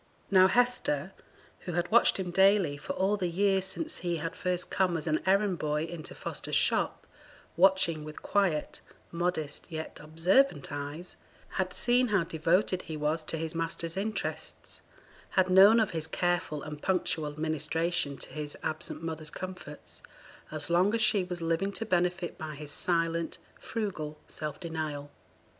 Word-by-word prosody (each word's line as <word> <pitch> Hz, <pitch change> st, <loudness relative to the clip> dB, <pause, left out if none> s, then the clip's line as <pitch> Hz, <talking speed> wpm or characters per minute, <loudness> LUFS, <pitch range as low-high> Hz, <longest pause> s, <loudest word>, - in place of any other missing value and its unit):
Now 185 Hz, -1 st, +7 dB
Hester, 240 Hz, -, +1 dB, 0.5 s
who 175 Hz, -, -6 dB
had 175 Hz, +2 st, -1 dB
watched 235 Hz, -, +5 dB
him 180 Hz, -2 st, -2 dB
daily 190 Hz, -4 st, +4 dB
for 145 Hz, -, -5 dB
all 195 Hz, +2 st, +1 dB
the 180 Hz, -3 st, -1 dB
years 190 Hz, +2 st, +2 dB
since 310 Hz, +12 st, -2 dB
he 175 Hz, -1 st, -1 dB
had 165 Hz, +1 st, -4 dB
first 180 Hz, -1 st, -2 dB
come 180 Hz, -3 st, +2 dB
as 155 Hz, -, -5 dB
an 155 Hz, -2 st, +1 dB
errand 195 Hz, -1 st, +3 dB
boy 150 Hz, 0 st, 0 dB
into 165 Hz, -1 st, -6 dB
Foster's -, -, -3 dB
shop -, -, +1 dB, 0.5 s
watching 175 Hz, -3 st, +4 dB
with 155 Hz, 0 st, -9 dB
quiet, 185 Hz, -7 st, 0 dB, 0.3 s
modest, 170 Hz, -4 st, -2 dB
yet 160 Hz, -1 st, -6 dB
observant 165 Hz, -, +2 dB
eyes 145 Hz, +5 st, -5 dB, 0.3 s
had 185 Hz, -1 st, -1 dB
seen 245 Hz, +5 st, +3 dB
how 205 Hz, -5 st, +2 dB
devoted 170 Hz, +4 st, +1 dB
he 155 Hz, -1 st, -6 dB
was 150 Hz, +2 st, 0 dB
to 165 Hz, -, -1 dB
his 160 Hz, +1 st, -3 dB
master's 165 Hz, 0 st, -2 dB
interests, 215 Hz, +3 st, -3 dB, 0.6 s
had 185 Hz, -1 st, +4 dB
known 200 Hz, +5 st, +8 dB
of 220 Hz, -, +2 dB
his 160 Hz, -2 st, -3 dB
careful 175 Hz, -4 st, -1 dB
and 150 Hz, -1 st, -7 dB
punctual 160 Hz, -5 st, -1 dB
ministration 155 Hz, -1 st, 0 dB
to -, -, -5 dB
his 150 Hz, -1 st, -5 dB
absent 155 Hz, +1 st, -2 dB
mother's 160 Hz, -2 st, -3 dB
comforts, 150 Hz, -, -7 dB, 0.5 s
as 155 Hz, +1 st, -1 dB
long 185 Hz, +6 st, +4 dB
as 230 Hz, -, 0 dB
she 205 Hz, -3 st, +4 dB
was 180 Hz, -2 st, -4 dB
living 165 Hz, +4 st, 0 dB
to 225 Hz, -, -2 dB
benefit 180 Hz, -2 st, 0 dB
by 155 Hz, -2 st, -5 dB
his 145 Hz, 0 st, -4 dB
silent, 165 Hz, -1 st, 0 dB, 0.2 s
frugal 165 Hz, -9 st, -4 dB
self 150 Hz, -2 st, -5 dB
denial. 155 Hz, -4 st, -4 dB
170 Hz, 155 wpm, -30 LUFS, 155-190 Hz, 0.6 s, known